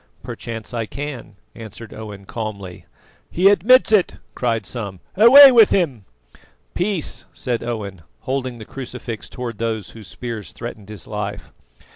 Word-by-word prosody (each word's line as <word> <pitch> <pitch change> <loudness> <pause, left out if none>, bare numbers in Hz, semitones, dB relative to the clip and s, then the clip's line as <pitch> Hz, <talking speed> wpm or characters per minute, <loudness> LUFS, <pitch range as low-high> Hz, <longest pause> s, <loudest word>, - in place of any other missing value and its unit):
"Perchance 115 0 -7
I 115 -2 -2
can," 140 -6 -7 0.2
answered 110 0 -10
Owen 105 -3 -9
calmly. 100 -5 -7 0.4
"He 185 +3 +4
admits 220 +6 +5
it!" 210 -4 +3 0.2
cried 115 -4 -1
some. 100 -4 -6 0.2
"Away 265 +7 +10
with 230 -4 +7
him!" 135 - 0 0.7
"Peace!" 180 -3 -2
said 120 -3 -2
Owen, 100 -6 -5 0.2
holding 130 -2 -3
the 110 - -10
crucifix 125 -3 -7
towards 120 -3 -6
those 110 -2 -3
whose 110 -4 -12
spears 115 +2 -7
threatened 110 -4 -8
his 105 -6 -8
life. - - -5
115 Hz, 135 wpm, -21 LUFS, 110-145 Hz, 0.7 s, Away